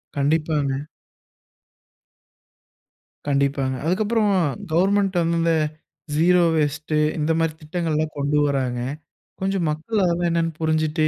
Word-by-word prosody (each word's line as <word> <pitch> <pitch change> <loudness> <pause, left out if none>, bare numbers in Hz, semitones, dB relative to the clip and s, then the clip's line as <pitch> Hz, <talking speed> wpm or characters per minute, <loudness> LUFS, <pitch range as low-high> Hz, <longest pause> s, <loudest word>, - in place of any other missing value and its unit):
கண்டிப்பாங்க. 145 -1 0 2.4
கண்டிப்பாங்க. 140 -2 0
அதுக்கப்புறம் 210 +4 +1 0.4
கவர்ன்மென்ட் 195 +2 +2
வந்து 170 0 +1
இந்த 165 0 +2 0.6
ஸீரோ 175 +3 +4
வேஸ்ட் 155 +1 -1 0.3
இந்த 155 +2 +1
மாதிரி 165 -1 +1
திட்டங்கள் 165 0 -2
எல்லாம் 155 0 -1
கொண்டு 145 +1 0
வர்றாங்க. 130 -4 -1 0.6
கொஞ்சம் 190 -2 0
மக்கள் 165 +8 -1
அதெல்லாம் 175 0 +1
என்னன்னு 165 -1 0
புரிஞ்சுட்டு 155 0 +1
160 Hz, 105 wpm, -22 LUFS, 150-175 Hz, 2.4 s, ஸீரோ